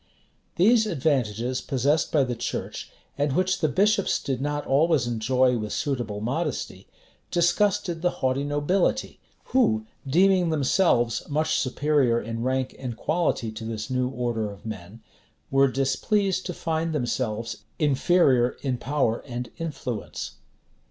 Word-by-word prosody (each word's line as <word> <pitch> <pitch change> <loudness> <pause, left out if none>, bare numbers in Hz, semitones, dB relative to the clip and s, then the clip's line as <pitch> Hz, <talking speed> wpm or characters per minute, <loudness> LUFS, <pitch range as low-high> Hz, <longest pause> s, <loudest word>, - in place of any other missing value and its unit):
These 220 +5 +4
advantages, 130 - 0
possessed 140 +4 +1
by 145 -3 +4
the 125 -2 -2
church, 115 - -4 0.3
and 145 -1 +1
which 185 -1 +1
the 155 - +2
bishops 200 +5 +2
did 135 -3 -3
not 145 +1 -2
always 145 -1 +3
enjoy 125 +2 +2
with 105 -1 -4
suitable 120 -7 -2
modesty, 135 +10 -3 0.4
disgusted 175 0 +1
the 180 - +3
haughty 130 -3 -1
nobility, 145 +6 0 0.3
who, 110 - +3 0.2
deeming 180 +4 +4
themselves 140 -5 +2
much 155 +2 +1
superior 135 -3 +2
in 115 +1 -5
rank 130 +1 -1
and 120 -4 -5
quality 155 -9 0
to 110 +1 -8
this 110 +2 -5
new 125 0 +1
order 120 -4 -2
of 100 +1 -12
men, 105 0 -8 0.5
were 135 0 +5
displeased 185 - 0
to 180 - -3
find 160 0 -1
themselves 120 -4 -2 0.2
inferior 140 -3 +3
in 130 -3 -1
power 135 -5 0
and 125 -1 -5
influence. 135 -9 -5
135 Hz, 130 wpm, -25 LUFS, 120-165 Hz, 0.5 s, were